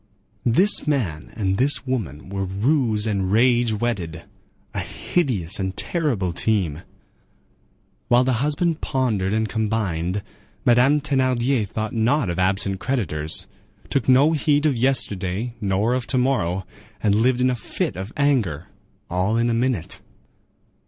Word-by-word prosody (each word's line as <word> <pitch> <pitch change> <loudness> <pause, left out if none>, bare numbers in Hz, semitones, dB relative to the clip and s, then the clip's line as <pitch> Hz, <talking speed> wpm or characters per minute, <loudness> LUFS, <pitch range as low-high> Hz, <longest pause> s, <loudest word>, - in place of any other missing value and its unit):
This 180 - +5
man 100 - -2
and 95 -3 -1
this 140 +1 +3
woman 95 - -4
were 100 0 -3
ruse 110 +3 +1
and 100 -3 -1
rage 120 +1 +3
wedded—a 100 -8 -5
hideous 110 - -1
and 95 0 -3
terrible 105 - 0
team. 90 -6 0 1.3
While 120 +1 +4
the 125 -2 0
husband 155 +3 0
pondered 110 -8 0
and 110 +1 0
combined, 100 -4 -2 0.4
Madame 130 +5 +4
Thénardier 130 -4 +1
thought 110 +2 -4
not 115 -1 +1
of 85 - -4
absent 95 +1 +1
creditors, 80 - -1 0.5
took 135 -2 0
no 135 +5 +5
heed 150 -1 +1
of 145 -4 +2
yesterday 115 -4 0
nor 100 +4 +1
of 125 -1 -2
to 130 - 0
morrow, 95 -9 0 0.4
and 105 -2 +3
lived 120 +4 +2
in 130 0 +3
a - - -1
fit 110 - -3
of 95 +4 -6
anger, 120 - 0 0.4
all 95 +5 0
in 120 0 +1
a - - +1
minute. 120 -6 -1
115 Hz, 135 wpm, -22 LUFS, 95-130 Hz, 1.3 s, This